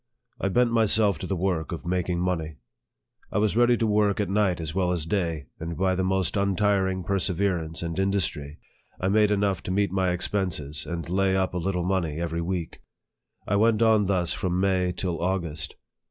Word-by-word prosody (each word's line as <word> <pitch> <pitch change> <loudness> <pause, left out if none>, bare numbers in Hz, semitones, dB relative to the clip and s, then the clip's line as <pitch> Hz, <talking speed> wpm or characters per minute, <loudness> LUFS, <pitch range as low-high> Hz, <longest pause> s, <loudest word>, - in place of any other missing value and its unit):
I 100 - 0
bent 120 +4 +2
myself 110 -2 +3
to - - -5
the 95 - -1
work 90 -2 -1
of 85 - -6
making 90 0 -1
money. 80 -4 -2 0.8
I - - -1
was 105 -1 +2
ready 120 0 +4
to 115 - 0
work 105 -1 +2
at 100 -3 -1
night 100 -3 +2
as 80 -2 -4
well 90 -1 +1
as 85 -4 -2
day, 85 -5 -1
and 80 0 -5
by 95 0 +2
the 95 0 0
most 95 -1 0
untiring 100 -1 +1
perseverance 90 -3 -1
and 85 +1 -3
industry, 85 -7 -1 0.4
I 95 - 0
made 105 +1 +4
enough 100 -3 +1
to - - -7
meet 100 0 +1
my 95 -1 +1
expenses, 90 -5 -2
and 85 -2 -4
lay 95 +2 +1
up 95 -1 0
a 90 - -1
little 90 0 -1
money 85 -5 -1
every 85 0 -2
week. 85 -1 -4 0.7
I 100 - +2
went 110 +1 +3
on 110 -3 +4
thus 90 -3 +1
from 90 -2 -1
May 95 -2 +1
till 90 -2 -3
August. 85 -4 -2
95 Hz, 190 wpm, -26 LUFS, 85-100 Hz, 0.8 s, ready